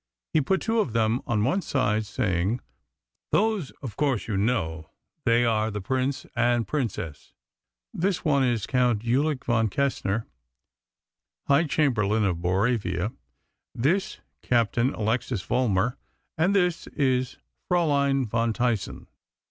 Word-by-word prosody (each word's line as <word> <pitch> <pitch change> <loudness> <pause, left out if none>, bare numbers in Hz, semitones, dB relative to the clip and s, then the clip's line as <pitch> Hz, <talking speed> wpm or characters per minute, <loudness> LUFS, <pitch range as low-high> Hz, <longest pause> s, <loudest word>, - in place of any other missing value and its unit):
He 155 - +4
put 190 +8 0
two 225 0 +1
of 145 - 0
them 115 +1 +1
on 105 -3 +1
one 140 - +1
side, 110 - 0
saying: 100 +2 0 0.7
"Those, 215 -8 +1
of 115 -7 -6
course, 135 -4 0
you 110 - -2
know; 85 -7 -1 0.4
they 120 +1 +4
are 110 -1 +1
the 105 -1 -4
Prince 130 +6 -1
and 120 -1 +2
Princess. 100 - -4 0.6
This 190 +1 -1
one 140 -3 +3
is 120 -5 +1
Count 125 -4 +1
Ulik 135 +4 0
von 115 -2 +2
Kessner, 115 -4 -1 1.2
High 145 +4 +4
Chamberlain 110 -9 +2
of 90 -3 0
Boravia; 95 +2 0 0.6
this, 170 +11 0 0.2
Captain 120 +1 +2
Alexis 115 -1 -1
Vollmar; 120 -1 +1 0.4
and 180 +6 +2
this 180 -3 +1
is 130 -3 0 0.3
Fraülein 140 -7 +2
von 115 +1 0
Tyssen." 115 -4 -1
120 Hz, 125 wpm, -26 LUFS, 110-140 Hz, 1.2 s, He